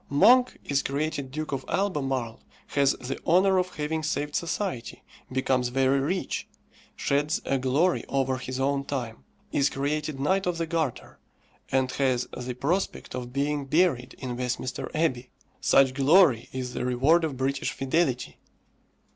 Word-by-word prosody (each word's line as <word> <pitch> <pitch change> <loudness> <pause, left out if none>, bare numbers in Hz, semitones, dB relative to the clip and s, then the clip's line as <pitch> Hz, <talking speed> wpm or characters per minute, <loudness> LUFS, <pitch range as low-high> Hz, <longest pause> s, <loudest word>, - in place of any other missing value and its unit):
Monk 245 - +5
is 140 -1 +1
created 140 -1 -2
Duke 155 +3 -5
of 135 -1 -2
Albemarle, 135 - -1 0.3
has 140 -1 +3
the 130 +2 -6
honour 185 +3 +4
of 180 0 -3
having 155 +1 -2
saved 150 -2 -2
society, 170 - -3 0.3
becomes 130 -1 +1
very 135 +2 +2
rich, 175 +8 -2 0.5
sheds 145 +2 0
a 135 - +1
glory 140 +8 +2
over 135 -1 0
his 130 +1 -5
own 140 +1 +1
time, 120 - -5 0.3
is 140 -1 +2
created 150 +1 -2
Knight 190 +7 +1
of 175 -1 0
the 165 - -1
Garter, 160 -6 -3 0.5
and 130 -1 +2
has 130 -3 +1
the 125 0 -5
prospect 165 +10 -2
of 125 -1 -5
being 140 +1 -1
buried 145 -4 +1
in 125 -2 -5
Westminster 125 +1 -3
Abbey. 130 -6 0 0.3
Such 135 -1 +4
glory 140 - +4
is 125 -1 -4
the - - -3
reward 135 +7 +3
of 150 -5 -2
British 135 +2 -1
fidelity! 135 -2 -1
140 Hz, 145 wpm, -27 LUFS, 130-160 Hz, 0.5 s, Monk